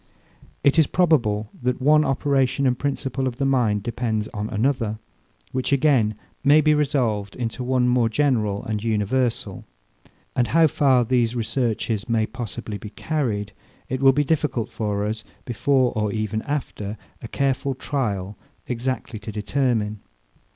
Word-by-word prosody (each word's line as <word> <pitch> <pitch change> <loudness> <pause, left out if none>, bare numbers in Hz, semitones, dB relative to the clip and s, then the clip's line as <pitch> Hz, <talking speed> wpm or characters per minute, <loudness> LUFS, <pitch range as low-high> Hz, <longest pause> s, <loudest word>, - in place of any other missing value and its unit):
It 140 +3 +4
is 155 - +5
probable, 115 - +2
that 125 0 0
one 150 +3 +5
operation 135 -1 +1
and 125 -1 +3
principle 135 -1 -2
of 125 - -3
the 135 - -1
mind 115 -7 +2
depends 110 -2 -2
on 105 +1 -4
another; 115 -1 0 0.5
which, 130 +1 -2
again, 130 -7 +3 0.3
may 145 +2 +6
be 155 0 +4
resolved 125 -9 0
into 120 0 -3
one 125 0 +2
more 125 -2 +3
general 110 -6 +1
and 110 -1 -3
universal: 115 +2 -1 0.7
And 120 -2 +2
how 165 +7 +4
far 135 -4 +3
these 120 -1 +1
researches 115 -2 -1
may 110 -1 +2
possibly 110 -3 -6
be 105 - -8
carried, 110 -7 -2 0.4
it 130 +1 -2
will 135 0 +7
be 145 +2 +1
difficult 145 -7 0
for 105 -2 -2
us, 110 +1 -3 0.2
before, 130 +1 +2
or 105 -1 0
even 110 0 -2
after, 110 -7 -3 0.2
a - - -6
careful 135 +2 -1
trial, 105 -8 -2 0.3
exactly 125 -2 -3
to 110 +1 -7
determine. 110 -1 -1
125 Hz, 145 wpm, -23 LUFS, 110-135 Hz, 0.7 s, will